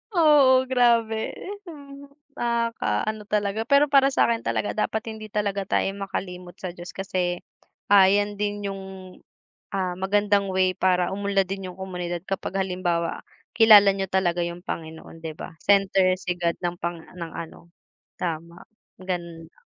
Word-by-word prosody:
Oo, 285 -6 +6
grabe, 235 -3 +2
ehem, 290 -8 -10 0.3
nakakaano 230 - -1
talaga. 210 0 0
Pero 280 +1 +6
para 275 -1 +5
sa'kin 235 -3 +2
talaga - - -1
dapat 220 +1 -1
hindi 215 -1 -9
talaga 200 -1 -1
tayo - - +1
makalimot 180 -2 -6
sa 180 -2 -6
Diyos 175 0 -9
kasi 180 -2 -2 0.5
ayan 205 +1 +5
din 205 0 -2
yung, 195 0 -6 0.9
ah, 185 -2 -1
magandang 200 0 +1
way 185 0 +2
para 180 -1 +2
umunlad 200 -1 0
din 195 -1 -5
yung 180 - -14
komunidad. 180 -2 -4
Kapag 195 0 -2
halimbawa, 175 -3 -2 0.3
kilala 215 -3 +8
niyo 195 -1 -2
talaga 175 -2 +1
yung 175 +1 -7
Panginoon, 160 0 -7
di 160 - -5
ba, - - -8
center 195 -2 +3
si 180 -1 -4
God 170 -1 0
ng 175 0 -2
pang 170 0 -2
ng 170 -1 -9
ano 170 0 -9 0.5
tama, 170 0 -5 0.4
ganun 170 -3 -5
lang. - - -31
195 Hz, 145 wpm, -24 LUFS, 180-215 Hz, 0.9 s, kilala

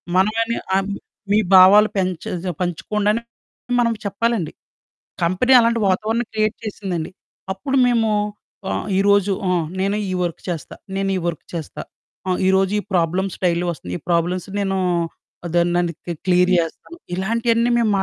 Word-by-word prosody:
మనమని 225 +5 +2
ఆ 190 - +4 0.5
మీ 210 - +5
భావాలు 195 +3 +8
పెంచె 185 -3 -2
స - - -7
ఆహ్, - - -11
పంచుకోండని 210 +5 0 0.6
మనం 235 -1 +2
చెప్పాలండి. 200 -3 -1 0.7
కంపెనీ 185 +10 +3
అలాంటి 230 0 +2
వాతావరణం 220 +5 0
క్రియేట్ 215 0 +1
చేసిందండి. 190 -7 -4 0.4
అప్పుడు 270 +8 -2
మేము 230 -2 +2 0.6
ఆహ్, - - -2
ఈ - - +3
రోజు 200 0 +4 0.2
ఆహ్, 175 -3 +1
నేను 200 +2 0
ఈ - - -1
వర్క్ 170 -2 -4
చేస్తా. 165 -3 -5 0.2
నేనీ 195 0 0
వర్క్ 165 -3 -4
చేస్తా. 165 -3 -5 0.5
ఆహ్, 185 - 0
ఈ - - +5
రోజు 190 0 +2
ఈ - - -3
ప్రాబ్లమ్ 180 +2 +1
స్టైలో 175 -1 +1
వస్తుంది. 110 - -7
ఈ - - -30
ప్రాబ్లమ్స్ 175 +2 0
నేను 195 -1 0 0.7
అదోనండి 175 0 +1
క్లి 175 - -3
క్లియర్ 180 0 +3
జేస్తాను. 170 - -4 0.2
ఇలాంటియన్నీ 230 +4 +1
మేము 230 -2 +2
190 Hz, 145 wpm, -21 LUFS, 175-215 Hz, 0.7 s, భావాలు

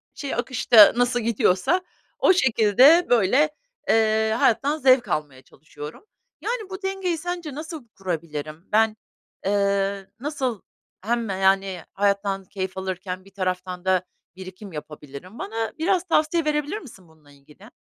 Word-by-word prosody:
şey, 280 -2 -4
akışta 240 -3 +6
nasıl 245 0 +1
gidiyorsa 230 - +1 0.4
o - - +5
şekilde, 265 - +5
böyle, 245 +6 +4 0.4
eee, 220 0 +3
hayattan 280 +6 +2
zevk 255 -4 +4
almaya 145 -4 -3
çalışıyorum. 150 - -12 0.4
Yani, 460 -5 -3
bu 380 +1 -7
dengeyi 385 -3 -1
sence 350 -2 -5
nasıl 310 -4 -8
kurabilirim? 160 -5 -5
Ben, 220 0 +3 0.5
eee, 200 0 0
nasıl 260 -5 -3 0.4
hem, 230 +2 -1
yani, 190 -1 +1
hayattan 200 -1 0
keyif 190 -1 -5
alırken 185 0 -5
bir 195 - -17
taraftan 185 -1 -3
da 185 -1 +2 0.3
birikim 190 +2 -10
yapabilirim? 150 - -10
Bana 225 +1 -3
biraz 360 +2 +1
tavsiye 330 -1 +1
verebilir 300 +4 -1
misin 195 - -14
bununla 155 -2 -22
ilgili? 150 +9 -18
210 Hz, 130 wpm, -23 LUFS, 185-280 Hz, 0.5 s, akışta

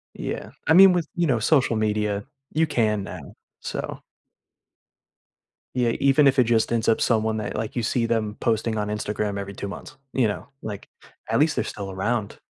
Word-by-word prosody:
Yeah. - - -5 0.2
I 160 - +5
mean, 190 +1 +9
with, 170 -4 0
you 175 -2 +1
know, 120 -5 +2
social 130 -1 +3
media, 105 -1 0 0.3
you 160 +1 +2
can 105 -7 +1
now, - - -9 0.3
so - - -5 1.8
Yeah, 125 -2 +2
even 140 +1 +5
if 135 0 +3
it 125 - +5
just 115 0 +2
ends 115 -1 +1
up 115 - +3
someone 110 -1 +1
that, 105 - -4
like, 110 0 -4
you 120 - -1
see 115 +1 0
them 110 -2 -1
posting 110 -1 0
on 105 0 -1
Instagram 105 -1 -2
every 100 0 -6
2 100 - -5
months, 145 +8 -9 0.2
you 125 -4 +3
know? 105 - -4 0.2
Like, 105 -2 -6 0.4
at 115 - +2
least 150 +1 +3
they're - - 0
still 100 -2 -6
around. 100 +3 -2
110 Hz, 185 wpm, -24 LUFS, 105-130 Hz, 1.8 s, mean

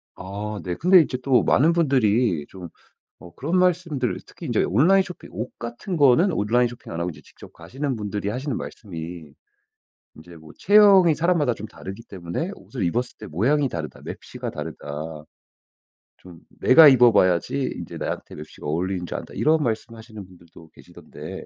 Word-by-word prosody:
아 105 +2 -6
네. 90 -1 -3
근데 180 - +5
인제 130 -5 -1
또 130 -1 +3
많은 155 +6 +3
분들이 120 - +2
좀 90 -3 -10 0.5
어 85 - -14
그런 165 +7 -2
말씀들 170 -8 0
특히 - - -10
인제 - - +1
온라인 160 - +4
쇼핑 180 - -11
옷 110 +6 -6
같은 120 - -5
거는 145 +7 +4
온라인 120 0 +2
쇼핑 120 0 -9
안 80 - -5
하고 85 +1 -2
이제 80 - -12
직접 - - -16
가시는 135 +1 -5
분들이 105 -2 -4
하시는 130 +3 -3
말씀이 85 -6 -8 0.8
인제 85 +2 -14
뭐 80 -1 -15
체형이 200 -4 +6
사람마다 160 -6 +1
좀 110 - -8
다르기 100 +1 -10
때문에 95 - -5
"옷을 125 -9 -6
입었을 120 +9 -2
때 110 - -9
모양이 130 - +1
다르다. 80 -5 -7
맵시가 - - -7
다르다. 75 +1 -7 0.9
좀 90 -2 -14 0.2
내가 150 +3 +8
입어 125 -3 +6
봐야지 95 +8 +1
인제 - - -8
나한테 - - -5
맵시가 75 0 -10
어울리는 90 +4 -2
줄 - - -6
안다." - - -9
이런 155 0 +2
말씀하시는 110 -2 -5
분들도 85 -2 -17
계시던데. - - -11
115 Hz, 360 characters per minute, -23 LUFS, 90-145 Hz, 0.9 s, 내가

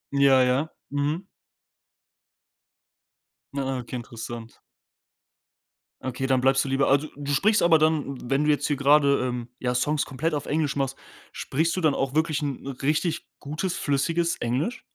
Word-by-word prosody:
Ja, 135 -2 +5
ja, 130 +5 +1 0.2
mhm. 145 +6 -1 2.3
Ah, 135 -1 -1
okay, 125 +1 -7
interessant. 115 -1 -8 1.4
Okay, 130 +1 -3
dann 130 -1 +2
bleibst 135 +1 +3
du - - -3
lieber 135 +1 +2
also 145 +3 +3
du 145 0 -4
sprichst 210 +10 +3
aber 170 -2 +6
dann 155 -4 +1
wenn 140 +2 +2
du 150 - +1
jetzt 150 - +2
hier 145 - +1
grade, 140 0 +4
ähm, 125 -2 -3
ja, 125 -1 -1
Songs 145 +4 +1
komplett 150 +4 -2
auf 145 - -2
Englisch 150 -2 0
machst, 135 -1 -1 0.3
sprichst 160 +4 -1
du 185 - -2
dann 155 -3 +3
auch 135 0 -1
wirklich 155 -1 +1
'n 140 -2 -4
richtig 155 +3 0
gutes, 155 +5 -3
flüssiges 165 +5 0
Englisch? 140 - -2
140 Hz, 155 wpm, -25 LUFS, 135-155 Hz, 2.3 s, aber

